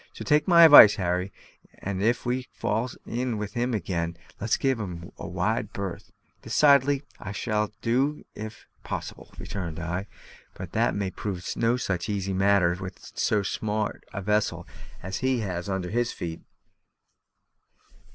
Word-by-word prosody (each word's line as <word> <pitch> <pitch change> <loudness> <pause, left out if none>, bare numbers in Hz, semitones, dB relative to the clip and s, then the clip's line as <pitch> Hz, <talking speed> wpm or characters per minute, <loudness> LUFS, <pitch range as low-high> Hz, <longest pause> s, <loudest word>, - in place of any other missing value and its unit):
So - - -8
take 150 -1 +3
my 170 -2 +8
advice, 145 -9 +10
Harry, 90 +1 -1 0.5
and, 95 -1 -4
if 115 +5 +1
we 125 +1 -1
fall 115 +4 -1 0.2
in 120 -1 -2
with 105 -1 -5
him 120 0 0
again, 85 -4 -2 0.2
let's 110 +2 +1
give 135 -3 +1
him 85 -4 -6
a - - -6
wide 100 +4 -1
berth." 100 -3 -5 0.3
"Decidedly; 140 -1 +4 0.2
I 95 - -6
shall 105 0 -1
do 135 +6 +1
so - - -17
if 110 +1 -8 0.2
possible," - - -6
returned 90 -5 -5
I. 90 +4 -3 0.5
"But - - -8
that - - +1
may 100 -2 -2
prove 95 -3 -5
no 115 +2 +2
such 95 -4 -2
easy 100 -2 -2
matter 95 -2 +3
with 95 0 -9
so 105 -2 +1
smart 105 +1 -2
a 100 - -5
vessel 105 +2 0 0.4
as 95 +1 -3
he 130 -2 0
has 90 -2 -4
under 95 -2 -2
his 120 +1 0
feet." 80 -2 -6
105 Hz, 155 wpm, -26 LUFS, 95-120 Hz, 0.5 s, advice